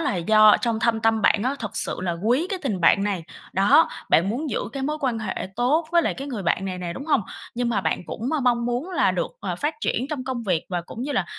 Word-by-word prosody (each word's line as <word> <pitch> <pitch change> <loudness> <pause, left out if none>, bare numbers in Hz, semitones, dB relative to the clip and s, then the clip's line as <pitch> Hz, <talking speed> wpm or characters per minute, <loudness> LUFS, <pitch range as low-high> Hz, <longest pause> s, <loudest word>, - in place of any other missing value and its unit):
là 295 - 0
do 215 +4 +6
trong 230 -2 -1
thâm 230 -2 +1
tâm 225 -1 +2
bạn 205 +1 +3
á, 260 +3 0
thực 220 -5 -6
sự - - -1
là 175 -2 -1
quý 255 +10 +2
cái 380 -1 -2
tình 210 -10 -2
bạn 195 +3 +5
này. 195 -5 -2 0.3
Đó, 200 - +5 0.2
bạn 175 +4 +4
muốn 275 +7 -2
giữ - - -1
cái 270 0 -4
mối 300 +2 -2
quan 255 -5 0
hệ 220 -3 -4
tốt 285 +7 +2
với 340 -1 +5
lại - - 0
cái 275 +2 -6
người 230 -7 -4
bạn 180 +2 0
này 185 -1 -4
nè, 175 -1 -4
đúng 225 - -7
hông? 290 -6 +3 0.3
Nhưng 245 0 -1
mà 220 -4 +1
bạn - - -1
cũng 235 +4 -4
m 305 -4 -1
mong 235 -1 +2
muốn 245 +9 -2
là - - +2
được, - - -2
ờ, - - -3
phát 300 +2 -1
triển 250 -2 -1
trong 280 -4 -3
công 255 -2 -3
việc, 180 -7 0
và 180 -2 -2
cũng 230 +7 -8
như 290 - -3
là 195 - +1
235 Hz, 275 wpm, -24 LUFS, 200-275 Hz, 0.3 s, do